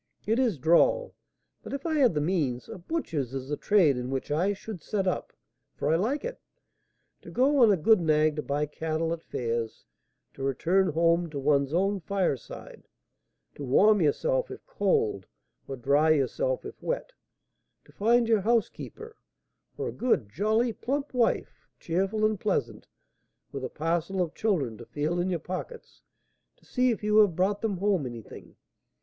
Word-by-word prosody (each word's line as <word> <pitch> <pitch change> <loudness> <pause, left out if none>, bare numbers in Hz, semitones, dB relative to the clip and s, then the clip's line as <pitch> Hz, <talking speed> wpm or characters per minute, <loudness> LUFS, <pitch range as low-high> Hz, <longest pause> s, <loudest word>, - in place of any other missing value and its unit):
It 225 +4 +1
is 235 - +1
droll, 170 - +3 0.5
but - - -8
if 280 +2 -5
I 325 - 0
had 265 - +3
the 150 - +1
means, 145 -7 -1
a - - -8
butcher's 165 - -3
is 135 0 -5
the 150 - 0
trade 165 -7 +3
in 125 0 -4
which 135 +1 -3
I 175 +7 +2
should 205 -2 -7
set 195 +4 -2
up, 185 - -2 0.4
for 150 +3 0
I - - +4
like 235 - -1
it. - - -6 0.8
To - - -12
go 275 +3 +2
on 225 -3 +7
a 195 - +3
good 195 +5 +4
nag 155 -1 +2
to - - 0
buy 145 +1 -1
cattle 160 +2 -2
at 165 - -6
fairs, 115 -5 -4 0.5
to - - -11
return 170 +8 +1
home 170 +1 +2
to 150 - -6
one's 140 0 +2
own 195 +4 +1
fireside, 180 -7 -4 0.7
to 145 - -8
warm 200 +10 +4
yourself - - +1
if - - -10
cold, 450 -4 0 0.4
or 135 - -4
dry 140 +5 +2
yourself 485 - +1
if - - -9
wet, - - -3 0.7
to - - -19
find 235 +3 +2
your 220 -3 +3
housekeeper, 240 - -2 0.6
or - - -2
a - - -7
good, 230 - 0
jolly, 220 - +1
plump 275 +6 -3
wife, 245 -2 0
cheerful 195 +5 0
and 215 -2 0
pleasant, - - -2 0.6
with 135 -1 -6
a 130 - -3
parcel 170 +4 -2
of 175 -3 -1
children 145 - -1
to 120 - -9
feel 155 +4 -2
in 180 +2 0
your 180 - 0
pockets 185 - -8 0.6
to - - -27
see 255 0 +1
if 225 -3 -2
you 210 0 +2
have 205 -6 +5
brought 195 +3 +1
them 210 -4 -1
home 190 -7 +1
anything! 115 -3 -10
185 Hz, 175 wpm, -27 LUFS, 150-225 Hz, 0.8 s, on